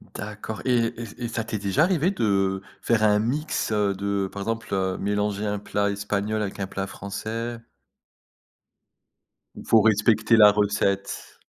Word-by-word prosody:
D'accord 105 +2 -6
et 125 -2 +2 0.2
et 120 +1 -7
et - - -1
ça 115 -1 -3
t'est 110 0 -4
déjà 100 +9 +2
arrivé 175 -1 +2
de 95 - +1 0.2
faire 115 -2 +2
un 105 -1 +4
mix, 125 +1 -1
heu, 105 -2 +2
de, 100 0 -2
par 100 - -5
exemple, 115 -1 -3
heu, 95 -1 0
mélanger 105 +1 -1
un 105 -1 -1
plat 100 0 -1
espagnol 105 +1 -2
avec 100 -2 -4
un 95 - -2
plat 95 0 -4
français? 115 +4 -5 2.0
Ou - - -9
faut 110 - +5
respecter 110 +1 +3
la 105 -1 +9
recette? 100 -1 -1
105 Hz, 155 wpm, -25 LUFS, 100-115 Hz, 2.0 s, la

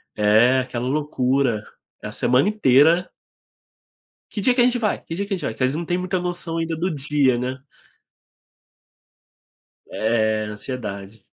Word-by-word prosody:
é 110 +5 +4
aquela 125 -1 -3
loucura, 130 -5 0 0.4
a - - -5
semana 130 +9 +2
inteira. 165 -2 +4 1.2
"Que 210 - -4
dia 245 +5 +3
que 250 - +1
a - - +6
gente 245 0 +2
vai? 215 -3 -1
Que 165 - -7
dia 200 +1 -2
que 200 - -7
gente - - -8
vai?" - - -1
Que 130 - -1
às 130 - +2
vezes 150 - -3
não 170 - -3
tem 175 +2 -1
muita 185 0 -1
noção 175 -2 -4
ainda 165 0 -2
do 175 0 -2
dia, 140 -3 +1
né? 130 +2 -4 2.3
É, 110 -1 0
ansiedade. 105 -3 -6
135 Hz, 160 wpm, -22 LUFS, 120-175 Hz, 2.3 s, a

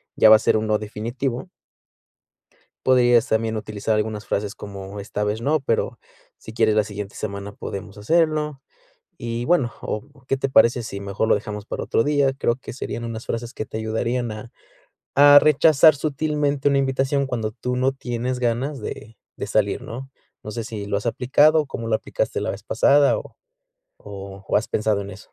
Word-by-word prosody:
ya 110 - +6
va - - +11
a - - -7
ser - - +2
un, 110 - -1
no 110 - +2
definitivo. 120 - -4 1.4
Podrías 120 -1 +4
también 110 0 0
utilizar 110 0 -2
algunas 105 0 -2
frases 100 0 -2
como: 100 0 -8
"Esta 105 +1 -3
vez 105 +2 -1
no, 150 +3 +1
pero 115 -4 -1 0.4
si - - -11
quieres 110 -2 +2
la 110 - +4
siguiente 105 -1 -7
semana 100 -1 -5
podemos 100 +1 -7
hacerlo". 150 +3 +1 0.6
Y 115 0 -4
bueno, 140 -7 +2
o: 135 +5 -6
"¿Qué 135 - +1
te 135 - -1
parece 115 0 +5
si 100 -3 -6
mejor 100 +2 -2
lo - - +5
dejamos 105 -1 -5
para - - -4
otro 115 - +1
día?". 145 -2 +3
Creo 120 - +1
que 130 - -10
serían 120 -1 -5
unas 115 0 -6
frases 115 +2 -4
que 110 - -4
te 110 - -6
ayudarían 115 +2 -2
a 110 +2 -8 0.6
a 145 +1 +9
rechazar 155 +1 +5
sutilmente 145 -1 0
una 140 - +2
invitación 135 +1 +1
cuando 115 -4 -2
tú 125 +3 -4
no 130 +2 +2
tienes 125 -1 -3
ganas 125 +4 -1
de 110 0 -8 0.2
de 100 - -5
salir, 100 -1 +1
¿no? 130 +4 -8 0.3
No 105 - -6
sé 115 +2 -4
si 105 -2 -6
lo 100 - -2
has 105 - -6
aplicado 145 +6 +4
o, - - -6
¿cómo 115 -3 -5
lo 110 - +3
aplicaste - - -2
la - - -2
vez - - -8
pasada? 140 0 +4
O - - -9 0.6
o 100 0 -10
o, - - +1
¿has 110 - 0
pensado 105 -1 0
en 100 0 -6
eso? 95 +1 -13
115 Hz, 190 wpm, -22 LUFS, 105-135 Hz, 1.4 s, va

